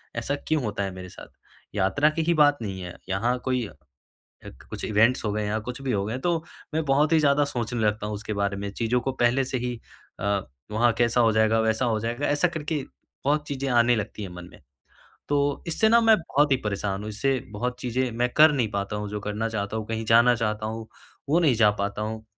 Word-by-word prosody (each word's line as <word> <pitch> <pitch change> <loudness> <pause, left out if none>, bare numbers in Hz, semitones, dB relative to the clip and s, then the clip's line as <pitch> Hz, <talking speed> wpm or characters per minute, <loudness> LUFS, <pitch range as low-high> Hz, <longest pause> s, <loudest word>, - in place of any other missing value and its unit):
ऐसा 120 +5 -1
क्यों 155 -4 +1
होता 100 -2 -2
है 95 - -3
मेरे 90 0 -8
साथ? - - -12 0.5
यात्रा 105 +10 +3
की 160 +1 -2
ही 170 - +2
बात 145 -2 +4
नहीं 95 -4 -5
है, 90 -1 -8
यहाँ 115 +6 0
कोई 125 -2 0
अ, - - -14 0.7
अक - - -12
कुछ - - -6
इवेंट्स 110 +4 +3
हो 105 - 0
गए 105 0 -1
या 105 +1 -1
कुछ 125 +2 -5
भी 135 -2 -1
हो 100 -1 0
गए, 115 +4 -3
तो 165 +2 -1 0.3
मैं 160 0 0
बहुत 145 +3 +2
ही 160 - +6
ज़्यादा 145 0 +3
सोचने 120 -3 -3
लगता 105 0 0
हूँ, 105 - -3
उसके 105 +1 -5
बारे 100 0 -1
में। 100 0 -4
चीज़ों 120 +4 0
को 135 +2 -2
पहले 130 +3 +3
से 130 0 -2
ही 125 0 -3 0.5
अ, 100 0 +1 0.3
वहाँ 115 +2 +3
कैसा 120 0 +3
हो 115 -1 +4
जाएगा? 110 +1 +3
वैसा 110 +3 +1
हो 110 -2 +1
जाएगा? 120 +6 -2
ऐसा 145 +5 +2
करके 155 -3 -3 0.4
बहुत 150 +1 +1
चीज़ें 140 -1 -3
आने 120 0 +4
लगती 105 0 -4
है 100 - -5
मन 90 0 -8
में। - - -17 0.7
तो 145 0 +1
इससे 220 +6 +2
ना 235 +1 +6
मैं 225 -1 +6
बहुत 145 -3 +1
ही - - +5
परेशान 100 -1 -2
हूँ, 105 - -6
इससे 130 +5 0
बहुत 125 +4 -3
चीज़ें 125 +1 -1
मैं 120 +2 0
कर 155 0 +8
नहीं 125 -6 0
पाता 100 +1 -3
हूँ, 105 0 -4
जो 105 0 -4
करना 105 +2 -2
चाहता 105 -1 -3
हूँ, 110 - -4
कहीं 115 0 -3
जाना 120 +2 +6
चाहता 110 -1 -2
हूँ, 110 0 -5 0.4
वो 160 +4 +4
नहीं 150 -7 +4
जा 110 -2 +5
पाता 100 +1 -2
हूँ। 110 0 -5
115 Hz, 235 wpm, -25 LUFS, 105-140 Hz, 0.7 s, कर